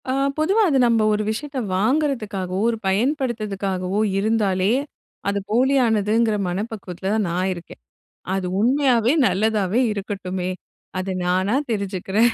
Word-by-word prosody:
அ -, -, +2 dB, 0.3 s
பொதுவா 380 Hz, +8 st, +2 dB
அது 275 Hz, -, +2 dB
நம்ம 230 Hz, -2 st, +3 dB
ஒரு 210 Hz, 0 st, 0 dB
விஷயத்த 280 Hz, +5 st, -5 dB, 0.2 s
வாங்குறதுக்காகவோ, 215 Hz, -6 st, 0 dB
ஒரு 230 Hz, -, -1 dB
பயன்படுத்துறதுக்காகவோ 205 Hz, -5 st, -1 dB, 0.2 s
இருந்தாலே 200 Hz, -3 st, +1 dB, 0.6 s
அது 200 Hz, 0 st, 0 dB
போலியானதுங்குற 225 Hz, -3 st, +2 dB
மனப்பக்குவத்துல 190 Hz, -1 st, -4 dB
தான் 215 Hz, -4 st, 0 dB
நான் 185 Hz, +2 st, 0 dB
இருக்கேன். 175 Hz, -1 st, -11 dB, 0.5 s
அது 190 Hz, -1 st, -1 dB
உண்மையாவே 250 Hz, 0 st, +3 dB
நல்லதாவே 205 Hz, +2 st, +1 dB
இருக்கட்டுமே, 190 Hz, -3 st, -4 dB, 0.5 s
அது 190 Hz, +1 st, -3 dB
நானா 185 Hz, +5 st, +1 dB, 0.2 s
தெரிஞ்சுக்கிறேன். 200 Hz, +2 st, +1 dB
210 Hz, 110 wpm, -22 LUFS, 190-235 Hz, 0.6 s, நம்ம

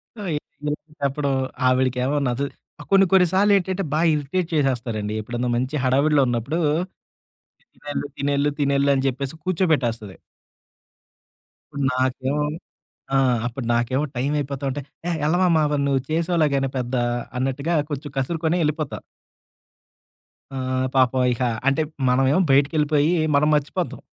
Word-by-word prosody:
So, 215 Hz, -, -9 dB, 0.4 s
ఇలాంటప్పుడు, 150 Hz, -1 st, -3 dB, 0.4 s
ఆవిడకేమో 130 Hz, +2 st, +1 dB
నచ్ఛ 125 Hz, +2 st, -2 dB, 0.5 s
కొన్ని, 195 Hz, 0 st, +6 dB
కొన్ని 190 Hz, -2 st, +6 dB
సార్లేంటంటే, 195 Hz, -1 st, +2 dB
బా 155 Hz, -, +2 dB
ఇరిటేట్ 155 Hz, +4 st, -2 dB
చేసేస్తారండి. 120 Hz, -7 st, -1 dB
ఎప్పుడన్నా 120 Hz, +3 st, -3 dB
మంచి 130 Hz, +4 st, -2 dB
హడావిడిలో 140 Hz, +3 st, +3 dB
ఉన్నప్పుడు, 120 Hz, +7 st, -1 dB, 1.2 s
తినెల్లు, 145 Hz, -1 st, -5 dB
తినెల్లు, 140 Hz, +1 st, +1 dB
తినెల్లు 140 Hz, 0 st, +2 dB
అని 135 Hz, 0 st, 0 dB
చెప్పేసి 135 Hz, +2 st, -4 dB
కూర్చోబెట్టేస్తది. 140 Hz, -, 0 dB, 1.8 s
నాకేమో 130 Hz, +3 st, 0 dB, 0.7 s
ఆ! -, -, +5 dB, 0.3 s
అప్పుడు 120 Hz, +1 st, -4 dB
నాకేమో 120 Hz, +4 st, +1 dB
టైమయిపోతా 140 Hz, +1 st, -2 dB
ఉంటే, 140 Hz, +2 st, -4 dB, 0.3 s
ఏ -, -, 0 dB, 0.2 s
ఎళ్లవమ్మా, 170 Hz, 0 st, +3 dB
మరి 145 Hz, -1 st, +1 dB
నువ్వు 135 Hz, -1 st, +1 dB
చేసేలేగాని 155 Hz, -4 st, +1 dB
పెద్ద 125 Hz, 0 st, -2 dB, 0.4 s
అన్నట్టుగా, 135 Hz, +5 st, -1 dB, 0.2 s
కొంచెం 145 Hz, -1 st, -5 dB
కసురుకొని, 160 Hz, +5 st, 0 dB
ఎళ్ళిపోతా. 150 Hz, -1 st, -2 dB, 1.6 s
ఆహ్, 130 Hz, 0 st, -1 dB
పాపం 130 Hz, 0 st, +3 dB
ఇహ 120 Hz, -, -7 dB, 0.3 s
అంటే, 140 Hz, +3 st, +3 dB, 0.3 s
మనమేమో 135 Hz, +7 st, +3 dB
బయటికెళ్ళిపోయి, 150 Hz, +2 st, +3 dB, 0.2 s
మనం 150 Hz, +2 st, +3 dB
మర్చిపోతాం. 150 Hz, +5 st, -2 dB
140 Hz, 110 wpm, -23 LUFS, 130-155 Hz, 1.8 s, కొన్ని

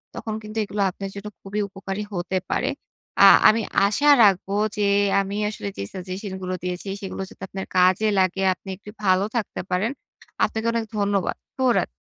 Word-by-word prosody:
তখন 220 Hz, -, -4 dB
কিন্তু 215 Hz, +1 st, -9 dB
এইগুলা 205 Hz, 0 st, -2 dB
আপনার 195 Hz, +1 st, -6 dB
জন্য 200 Hz, +1 st, -7 dB
খুবই 200 Hz, +2 st, -4 dB
উপকারী 195 Hz, +1 st, -5 dB
হতে 180 Hz, +1 st, -2 dB
পারে। -, -, 0 dB, 0.5 s
আ -, -, +9 dB, 0.2 s
আমি 225 Hz, +1 st, +4 dB, 0.2 s
আশা 285 Hz, +9 st, +1 dB, 0.2 s
রাখবো 195 Hz, -1 st, +3 dB, 0.2 s
যে 210 Hz, -, 0 dB, 0.4 s
আমি 195 Hz, +1 st, -4 dB
আসলে 210 Hz, -, -6 dB
যে -, -, -3 dB
সাজেশন 190 Hz, +1 st, -6 dB
গুলো 185 Hz, 0 st, -3 dB
দিয়েছি 180 Hz, +2 st, -4 dB
সেগুলো 195 Hz, -1 st, -5 dB
যাতে -, -, -13 dB
আপনার 190 Hz, 0 st, -5 dB
কাজে 185 Hz, +4 st, +4 dB
লাগে 190 Hz, +1 st, +1 dB
আপনি 190 Hz, +1 st, -13 dB
একটু 205 Hz, -, -13 dB
ভালো 185 Hz, 0 st, +3 dB
থাকতে 225 Hz, -, -2 dB
পারেন। 195 Hz, +7 st, 0 dB, 0.5 s
আপনাকে 220 Hz, +1 st, 0 dB
অনেক 230 Hz, -1 st, -1 dB
ধন্যবাদ। 200 Hz, -2 st, 0 dB, 0.2 s
ভো 260 Hz, -, +1 dB
রাত -, -, +1 dB
195 Hz, 175 wpm, -23 LUFS, 185-210 Hz, 0.5 s, আ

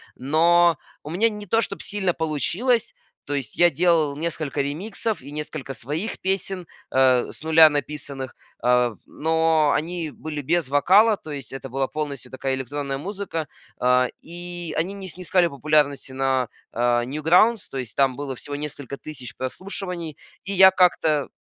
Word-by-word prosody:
Но 165 Hz, +4 st, +4 dB, 0.3 s
у 150 Hz, -, -8 dB
меня 200 Hz, +8 st, +2 dB
не 210 Hz, -2 st, -8 dB
то, 225 Hz, +5 st, +3 dB
чтоб 200 Hz, -2 st, -4 dB
сильно 195 Hz, -4 st, -1 dB
получилось. 190 Hz, -, 0 dB, 0.3 s
То 145 Hz, -, -4 dB
есть 135 Hz, -5 st, -3 dB
я 175 Hz, 0 st, +6 dB
делал 160 Hz, -2 st, +2 dB
несколько 155 Hz, -3 st, -2 dB
ремиксов 195 Hz, -, -3 dB
и 140 Hz, +2 st, -11 dB
несколько 150 Hz, -2 st, -5 dB
своих 150 Hz, -, -4 dB
песен, 190 Hz, -1 st, -1 dB, 0.3 s
э, 130 Hz, -2 st, +4 dB
с -, -, -10 dB
нуля 160 Hz, 0 st, +7 dB
написанных, 145 Hz, -3 st, -4 dB, 0.3 s
э, 125 Hz, -2 st, +3 dB
но 160 Hz, -1 st, +2 dB
они 165 Hz, 0 st, -3 dB
были 150 Hz, 0 st, -6 dB
без 165 Hz, 0 st, 0 dB
вокала. 195 Hz, +9 st, +5 dB
То 155 Hz, -, -10 dB
есть 140 Hz, -4 st, -7 dB
это 135 Hz, 0 st, -6 dB
была 135 Hz, +1 st, -1 dB
полностью 145 Hz, -4 st, -5 dB
такая 130 Hz, 0 st, -2 dB
электронная 135 Hz, +1 st, -4 dB
музыка. 180 Hz, -2 st, -4 dB, 0.3 s
А, 125 Hz, 0 st, +4 dB
и 175 Hz, 0 st, -7 dB
они 180 Hz, +5 st, 0 dB
не 195 Hz, -2 st, -7 dB
снискали 180 Hz, 0 st, +1 dB
популярности 145 Hz, -1 st, +1 dB
на, 130 Hz, -2 st, +1 dB, 0.2 s
а, 120 Hz, 0 st, +2 dB
Newgrounds. 170 Hz, -, +3 dB
То 135 Hz, -, -6 dB
есть 120 Hz, -4 st, -7 dB
там 135 Hz, -2 st, +3 dB
было 140 Hz, -2 st, -4 dB
всего 145 Hz, -, -6 dB
несколько 145 Hz, -2 st, -5 dB
тысяч 130 Hz, -8 st, -8 dB
прослушиваний. 175 Hz, +2 st, -5 dB, 0.3 s
И 200 Hz, -, -3 dB
я 190 Hz, 0 st, +8 dB
как-то 160 Hz, -6 st, +3 dB
155 Hz, 155 wpm, -23 LUFS, 135-175 Hz, 0.3 s, я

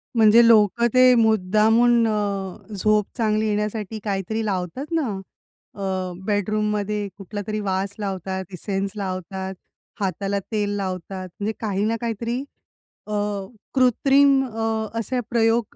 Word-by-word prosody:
म्हणजे 225 Hz, +1 st, +7 dB
लोक 220 Hz, 0 st, +5 dB
ते 255 Hz, 0 st, +7 dB
मुद्दामून 225 Hz, +2 st, +4 dB
अ, 200 Hz, -3 st, -2 dB
झोप 210 Hz, +1 st, +2 dB
चांगली 215 Hz, -1 st, +1 dB
येण्यासाठी 210 Hz, 0 st, -2 dB
काहीतरी 210 Hz, +2 st, -2 dB
लावतात 195 Hz, -, -3 dB
ना, 320 Hz, -6 st, +1 dB, 0.7 s
अ, 190 Hz, -2 st, -3 dB
बेडरूममध्ये 210 Hz, 0 st, 0 dB
कुठलातरी 205 Hz, +2 st, -5 dB
वास 195 Hz, 0 st, -1 dB
लावतात, 190 Hz, -1 st, -3 dB
इसेन्स 195 Hz, +1 st, -3 dB
लावतात, 190 Hz, -1 st, -4 dB, 0.5 s
हाताला 200 Hz, +1 st, -1 dB
तेल 205 Hz, -1 st, 0 dB
लावतात. 185 Hz, -1 st, -4 dB
म्हणजे 210 Hz, +2 st, -1 dB
काही 205 Hz, -2 st, -1 dB
ना 225 Hz, +1 st, +1 dB
काहीतरी 235 Hz, +3 st, -2 dB, 0.6 s
अ, -, -, -7 dB, 0.6 s
कृत्रिम 270 Hz, +2 st, +4 dB
अ, 225 Hz, -2 st, -2 dB
असे 250 Hz, +3 st, -2 dB
प्रयोग 230 Hz, -1 st, +1 dB
210 Hz, 115 wpm, -23 LUFS, 195-225 Hz, 0.7 s, म्हणजे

